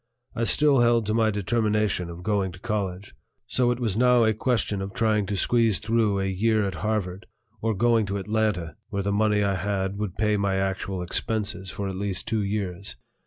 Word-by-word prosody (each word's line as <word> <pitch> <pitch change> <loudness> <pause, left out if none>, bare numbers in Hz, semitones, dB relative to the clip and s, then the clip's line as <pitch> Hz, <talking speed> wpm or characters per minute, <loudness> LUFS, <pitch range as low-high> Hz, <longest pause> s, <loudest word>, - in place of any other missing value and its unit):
I 115 -1 -1
still 145 +1 +4
held 120 -1 +3
to 105 - -1
my 110 -1 +3
determination 105 -3 0
of 85 +1 -9
going 100 -3 0
to 95 - -12
college; 100 - -3 0.3
so 125 -1 +1
it 120 0 -1
was 110 -6 -1
now 125 0 +4
a 110 0 +3
question 110 -3 -1
of 95 0 -6
trying 110 -3 +1
to 100 0 -2
squeeze 115 +1 +3
through 110 -2 +1
a 95 - -1
year 105 +3 +1
at 95 - -2
Harvard 100 -2 -2 0.3
or 110 -1 0
going 115 0 +2
to 100 +1 -2
Atlanta, 105 -3 -1
where 100 -1 -2
the 100 - -1
money 105 0 +2
I 100 -1 +1
had 95 0 -2
would 100 -4 -4
pay 105 -1 +2
my 100 -1 0
actual 95 -1 -2
expenses 100 0 -2
for 100 +2 -4
at 95 - -3
least 95 0 -3
two 110 -1 0
years. 100 -4 -4
105 Hz, 200 wpm, -25 LUFS, 95-110 Hz, 0.3 s, still